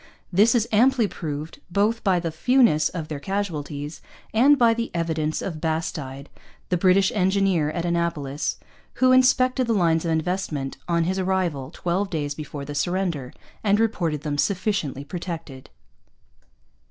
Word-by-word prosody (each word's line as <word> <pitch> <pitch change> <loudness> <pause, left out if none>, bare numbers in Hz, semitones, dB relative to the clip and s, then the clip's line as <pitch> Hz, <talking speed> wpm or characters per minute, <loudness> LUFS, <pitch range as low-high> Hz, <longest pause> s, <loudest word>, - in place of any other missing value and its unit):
This 210 +7 +5
is 230 -1 +2
amply 240 +1 +4
proved 155 -3 -6
both 210 +5 +1
by 185 -3 +3
the 165 -1 -3
fewness 230 - +3
of 165 -4 -5
their 150 -2 -5
casualties 155 -6 -4 0.3
and 270 +6 +5
by 235 -3 +5
the 230 +1 -3
evidence 160 -2 -1
of 160 -5 -5
Bastide, 150 -4 -3 0.4
the 180 - +2
British 190 +2 +4
engineer 190 -5 +2
at 170 +2 -3
Annapolis, 170 -5 -1 0.4
who 255 0 +4
inspected 255 0 +4
the 230 - +2
lines 165 -5 +2
of 170 - -2
investment 160 -4 -2
on 170 -1 +2
his 190 +3 -1
arrival, 180 -8 -1
twelve 180 +3 -1
days 145 -4 -2
before 145 -1 -7
the 145 - -6
surrender, 170 -5 -1 0.3
and 205 0 +3
reported 170 -10 0
them 145 -2 -3
sufficiently 185 -8 -1
protected. 165 -5 -7
170 Hz, 145 wpm, -24 LUFS, 155-200 Hz, 0.4 s, This